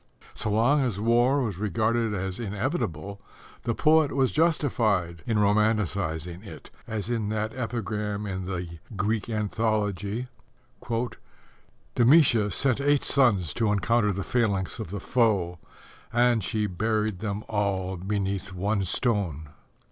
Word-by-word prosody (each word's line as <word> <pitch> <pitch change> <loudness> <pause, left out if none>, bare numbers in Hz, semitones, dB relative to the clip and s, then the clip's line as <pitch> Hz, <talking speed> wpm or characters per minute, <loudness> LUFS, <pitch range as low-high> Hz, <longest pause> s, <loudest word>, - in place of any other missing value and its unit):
So - - -2
long 120 +8 +3
as 120 -7 -1
war 120 +5 +3
was 105 -6 -3
regarded 110 +3 0
as 95 +1 -3
inevitable, 100 - -3 0.4
the 115 -2 0
poet 155 -2 +4
was 135 -2 +2
justified 115 - +1
in 115 - +1
romanticizing 100 -5 +1
it, 100 - -11 0.2
as 110 +1 -3
in 110 -3 -1
that 110 +1 -2
epigram 105 -4 -3
in 95 -2 -4
the 90 -3 -5 0.2
Greek 105 +2 -1
Anthology: 105 0 -1 1.7
Demætia 120 -5 +5
sent 135 +6 +1
eight 145 0 +2
sons 100 - +2
to 110 -3 +1
encounter 105 +1 +2
the 100 0 -3
phalanx 100 -7 0
of - - -5
the 100 +2 -4
foe, 100 -9 +1 0.5
and 120 -2 +3
she 105 +3 -1
buried 105 +1 -1
them 105 0 -3
all 100 -3 -1
beneath 95 0 -3
one 100 +2 0
stone. 90 - -1
105 Hz, 125 wpm, -26 LUFS, 95-115 Hz, 1.7 s, Demætia